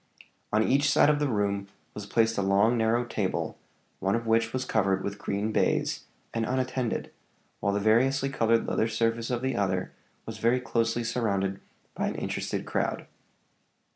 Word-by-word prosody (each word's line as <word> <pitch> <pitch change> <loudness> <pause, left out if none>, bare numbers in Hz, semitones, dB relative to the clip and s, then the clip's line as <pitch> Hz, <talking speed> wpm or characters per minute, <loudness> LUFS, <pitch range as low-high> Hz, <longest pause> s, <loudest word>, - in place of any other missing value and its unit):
On 110 +1 +3
each 140 +4 +3
side 145 - +5
of 145 - 0
the 145 - +1
room 100 -3 0 0.3
was 105 -1 -7
placed 115 +1 +2
a - - 0
long, 100 +4 +3
narrow 115 +1 +2
table, - - -2 0.4
one 95 +2 +1
of 115 0 -2
which 115 0 +2
was 130 +1 -2
covered 95 -5 +1
with 100 0 -4
green 100 +2 -2
baize, - - 0 0.3
and 115 - 0
unattended, 130 0 -1 0.5
while 100 - 0
the 100 - +1
variously 130 +6 +3
colored 115 -3 +2
leather 110 - +1
surface 115 +1 0
of 125 0 -2
the 130 -1 0
other 95 -3 -1 0.3
was - - -7
very 120 +2 +3
closely 115 -1 0
surrounded 100 -5 -1 0.3
by - - -1
an - - -3
interested - - -3
crowd. - - -2
115 Hz, 170 wpm, -28 LUFS, 100-120 Hz, 0.5 s, side